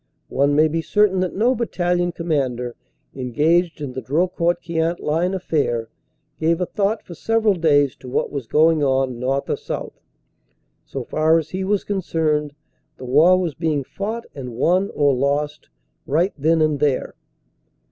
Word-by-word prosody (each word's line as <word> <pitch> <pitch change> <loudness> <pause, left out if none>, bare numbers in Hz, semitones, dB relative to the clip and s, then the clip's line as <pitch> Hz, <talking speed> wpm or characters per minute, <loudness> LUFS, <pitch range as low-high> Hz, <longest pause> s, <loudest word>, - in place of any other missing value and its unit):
One 140 +2 +2
may 155 +1 +5
be 165 +1 -1
certain 205 +1 +2
that 185 -1 -1
no 235 +6 +3
battalion 175 -7 0
commander 130 -8 -2 0.4
engaged 155 +7 +1
in 135 -3 -5
the 130 - -5
Drocourt 170 +4 0
Queant 165 +1 -1
line 170 +5 0
affair, 140 -11 -1 0.5
gave 165 +1 +1
a 180 - 0
thought 205 +4 -1
for 175 - -9
several 225 +4 +1
days 145 -6 +2
to 125 - -11
what - - -1
was 140 -5 -5
going 155 +2 +3
on 130 -3 +1
north 135 +2 -1
or - - -1
south. - - -6 0.8
So - - -5
far 160 +1 +2
as 160 -1 -3
he 190 +1 -3
was 200 +1 0
concerned, 155 -6 -1 0.4
the 130 - -9
war 160 +8 +5
was 175 -4 -2
being 155 -2 -1
fought 220 - -5
and 125 -4 -7
won 180 +10 +2
or 145 -2 +3
lost 145 +3 -1 0.4
right 170 +7 +1
then 160 +2 +2
and 155 -2 +1
there. 145 -3 0
160 Hz, 160 wpm, -21 LUFS, 140-180 Hz, 0.8 s, may